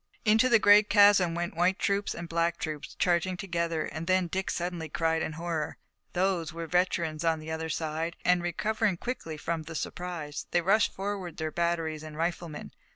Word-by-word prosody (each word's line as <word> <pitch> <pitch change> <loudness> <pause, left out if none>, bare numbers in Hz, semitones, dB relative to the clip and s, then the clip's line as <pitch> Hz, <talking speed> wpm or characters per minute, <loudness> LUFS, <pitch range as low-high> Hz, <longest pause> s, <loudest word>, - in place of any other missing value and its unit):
Into 225 +4 +5
the 235 - +7
great 210 0 +6
chasm 200 -4 +6
went 175 -1 -3
white 180 +3 +2
troops 200 0 0
and 170 - -6
black 170 0 0
troops, 155 -2 -5
charging 180 +1 +1
together, 170 -3 -1
and 160 +1 -6
then 185 0 +3
Dick 185 +3 -2
suddenly 175 -2 -3
cried 160 +1 0
in 155 - -2
horror. 165 -1 -3 0.4
Those 180 -2 0
were 165 +1 -5
veterans 170 -2 0
on 165 -1 +2
the 155 +1 -7
other 160 0 -3
side, 160 +2 -2
and, 180 0 +4
recovering 205 +3 0
quickly 170 -9 -5
from 165 +1 -2
the 160 +1 -9
surprise, 165 -3 -5
they 175 - +2
rushed 205 +6 +3
forward 195 -4 -4
their 155 -1 -2
batteries 165 -2 -1
and 155 -1 -9
riflemen. 165 -2 -3
170 Hz, 180 wpm, -29 LUFS, 160-185 Hz, 0.4 s, the